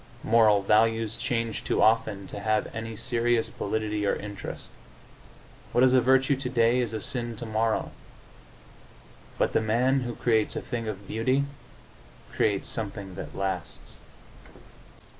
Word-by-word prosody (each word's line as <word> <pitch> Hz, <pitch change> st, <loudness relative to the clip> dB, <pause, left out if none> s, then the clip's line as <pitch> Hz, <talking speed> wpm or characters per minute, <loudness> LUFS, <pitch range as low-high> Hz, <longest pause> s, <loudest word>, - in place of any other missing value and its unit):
Moral 110 Hz, -3 st, +4 dB
values 110 Hz, +1 st, +2 dB
change 115 Hz, -2 st, -2 dB
too -, -, 0 dB
often 110 Hz, -3 st, +2 dB
to 100 Hz, -, -7 dB
have 110 Hz, +1 st, 0 dB
any 115 Hz, 0 st, -5 dB
serious 120 Hz, 0 st, 0 dB
validity 105 Hz, 0 st, -2 dB
or 100 Hz, -, +2 dB
interest; 100 Hz, -1 st, -7 dB, 1.0 s
what 120 Hz, -, +4 dB
is 130 Hz, 0 st, +5 dB
a 130 Hz, -, +6 dB
virtue 135 Hz, +3 st, +4 dB
today 125 Hz, -2 st, +2 dB
is 120 Hz, -4 st, -1 dB
a 110 Hz, -, -3 dB
sin 120 Hz, +1 st, -4 dB
tomorrow. 110 Hz, 0 st, -1 dB, 1.5 s
But -, -, +1 dB
the -, -, +3 dB
man 125 Hz, +5 st, +2 dB
who 120 Hz, -2 st, -4 dB
creates 110 Hz, -3 st, +1 dB
a -, -, -2 dB
thing 115 Hz, -2 st, -4 dB
of 100 Hz, -2 st, -6 dB
beauty 130 Hz, +5 st, +1 dB, 0.9 s
creates 100 Hz, -2 st, +1 dB
something 100 Hz, -3 st, -5 dB
that -, -, -8 dB
lasts. 95 Hz, -3 st, -4 dB
115 Hz, 135 wpm, -27 LUFS, 105-120 Hz, 1.5 s, a